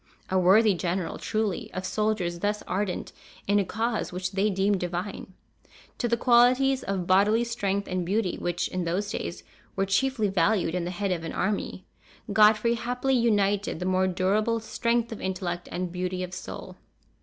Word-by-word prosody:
A 190 - +3
worthy 200 +4 +5
general, 180 0 -2
truly, 215 -4 -2
of 185 0 -3
soldiers 200 -4 -1
thus 205 +2 -1
ardent 190 0 -3 0.3
in 205 +1 +3
a - - +2
cause 225 +4 -2
which 185 +1 -3
they 200 +2 +1
deemed 195 0 +1
divine! 180 +2 -5 0.6
To 240 - +1
the 235 0 +1
qualities 255 +3 +4
of 195 -2 -2
bodily 205 +5 +4
strength 200 -4 -2
and 185 -1 -1
beauty, 190 +1 0
which 175 0 -1
in 185 -1 -3
those 195 +5 -1
days - - -5 0.3
were 195 - +1
chiefly 225 +3 +1
valued 190 -2 +1
in 180 -1 -1
the - - -3
head 195 +2 -2
of 170 -2 -2
an 165 - -5
army, 200 -2 -2 0.5
Godfrey 215 +3 +5
happily 245 +3 -1
united 205 -6 +1
the 180 - -3
more 185 0 +2
durable 205 +5 +1
strength 235 +1 -1
of 225 - -6
intellect 180 -2 -3
and 180 0 -3
beauty 180 +1 -3
of 180 0 -6
soul. 185 - -8
195 Hz, 170 wpm, -27 LUFS, 185-220 Hz, 0.6 s, worthy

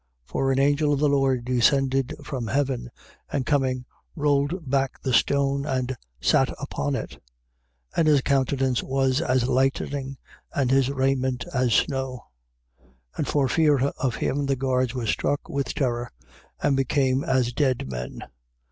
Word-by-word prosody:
For 135 - 0
an 130 - +1
angel 145 +2 +3
of 140 - 0
the 150 - +3
Lord 135 -3 +1
descended 130 +1 +2
from 125 -5 -4
heaven 130 -2 -1 0.4
and 135 -3 -1
coming 130 -3 0 0.3
rolled 145 +2 0
back 135 0 0
the 130 - -1
stone 140 +2 +2
and 130 -2 -2 0.2
sat - - +3
upon 70 0 -2
it. - - -4
28:3. - - -14 0.8
And 165 - +3
his 145 -3 +5
countenance 135 -1 +1
was 135 +1 +1
as 130 -6 +1
lightning 135 +1 0 0.4
and 130 -3 +1
his 135 -1 +3
raiment 130 -2 0
as 125 -3 +2
snow. 130 -2 -1 0.9
28:4. - - -19
And - - -1
for 140 -2 +2
fear 150 +2 +3
of 130 -5 -2
him, 140 +1 -1
the 135 - +2
guards 130 -1 0
were 125 -2 -2
struck 145 +6 -1
with 140 -1 -3
terror 120 -3 -1 0.5
and 140 - +2
became 135 0 +1
as 130 -6 +1
dead 130 - 0
men. 60 -1 -6
135 Hz, 155 wpm, -25 LUFS, 130-140 Hz, 0.9 s, his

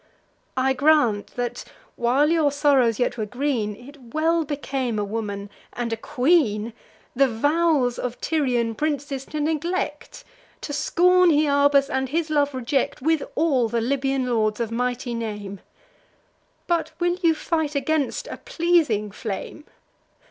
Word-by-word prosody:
I 265 +1 +2
grant 265 -7 +3
that, 245 -1 -3 0.3
while 265 +6 +2
your 315 -4 +3
sorrows 275 -6 +3
yet 245 -1 -1
were 215 - -1
green, 245 -3 -1
It 250 +1 -14
well 325 +1 +2
became 270 -5 -3
a 210 - 0
woman, 205 -1 -4 0.2
and 235 -1 -3
a - - +1
queen, 245 -4 +1 0.4
The 275 +2 +4
vows 285 +1 +1
of 250 -1 -4
Tyrian 250 -7 0
princes 285 -1 -3
to 305 - -5
neglect, 315 - -2 0.4
To 290 - -5
scorn 360 +4 +4
Hyarbas, 285 -2 +4
and 265 -2 -2
his 320 +2 -1
love 290 -2 +1
reject, 260 +2 -1
With 320 0 +2
all 275 -7 +2
the 235 - 0
Libyan 270 +2 0
lords 220 -3 0
of 230 -1 -2
mighty 245 +1 -2
name; 210 -4 -5 1.1
But 340 -2 -1
will 350 0 +1
you 330 -3 +3
fight 315 -2 -2
against 305 - 0
a - - -7
pleasing 330 - +1
flame! 215 +8 -6
275 Hz, 140 wpm, -23 LUFS, 235-310 Hz, 1.1 s, The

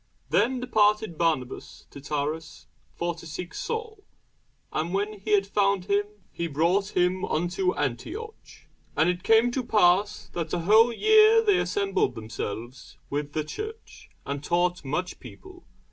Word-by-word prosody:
Then 255 +2 +2
departed 210 -5 +2
Barnabas 155 -7 -2
to 140 - -10
Tarsus, 150 +3 -4 0.3
for 170 0 -2
to 165 0 -12
seek 170 +3 -7
Saul: 450 -2 -5 0.7
and 165 +4 -1
when 205 +1 -2
he 210 +2 -2
had 200 -1 +4
found 200 -2 +1
him, 205 +1 +1 0.3
he 170 - -3
brought 175 +7 0
him 180 +1 +2
unto 180 +3 0
Antioch. 145 - -5 0.3
And 165 +3 +4
it 180 0 -6
came 225 +4 +4
to 255 +1 -2
pass, 200 -2 +2
that 165 -2 -4
a 175 - 0
whole 220 +7 +5
year 435 - +5
they 410 -4 +3
assembled 405 0 0
themselves 110 +3 -7
with 145 0 -3
the 155 - -1
church, 430 - -8 0.2
and 140 0 -4
taught 175 +2 0
much 180 +7 -3
people. 370 -2 -13
185 Hz, 145 wpm, -26 LUFS, 160-235 Hz, 0.7 s, whole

